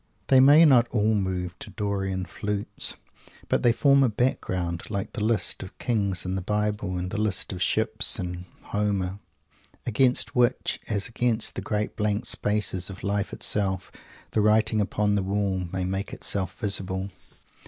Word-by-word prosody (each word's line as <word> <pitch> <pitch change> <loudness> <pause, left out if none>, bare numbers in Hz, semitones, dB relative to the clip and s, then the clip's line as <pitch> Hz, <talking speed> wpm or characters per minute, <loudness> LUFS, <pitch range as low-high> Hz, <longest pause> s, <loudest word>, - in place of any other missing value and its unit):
They 130 - +7
may 145 +5 +8
not 125 -5 +6
all 110 -2 +1
move 90 -3 -2
to - - -8
Dorian 95 -3 -2
flutes, 105 +3 -3 0.5
but - - +2
they 120 - +5
form 140 +3 +4
a 130 - +4
background 95 -7 -1
like 100 0 -4
the 110 - -3
lists 110 -3 0
of 95 - -7
the - - -34
Kings 100 -7 0
in 90 - -2
the 95 - -2
Bible 105 -1 -1
and 90 +1 -4
the 110 - -2
lists 105 -3 -1
of 90 - -6
the - - +1
Ships - - +1
in 90 0 -5 0.2
Homer 100 -2 -1 0.7
against 125 +2 +2
which, 120 -1 +2
as 100 -3 -1
against 115 -1 0
the - - -4
great 105 0 -2
blank 105 0 -1
spaces 105 -3 0
of 95 -1 -9
Life 100 0 -1
itself, 95 -2 0 0.4
"the 110 - +2
writing 110 +1 +3
upon 105 +1 0
the 100 - +2
wall" 95 -2 -1
may 95 -1 -2
make 95 +2 -3
itself 95 -3 -1
visible. 100 -3 -1
105 Hz, 170 wpm, -26 LUFS, 95-110 Hz, 0.7 s, may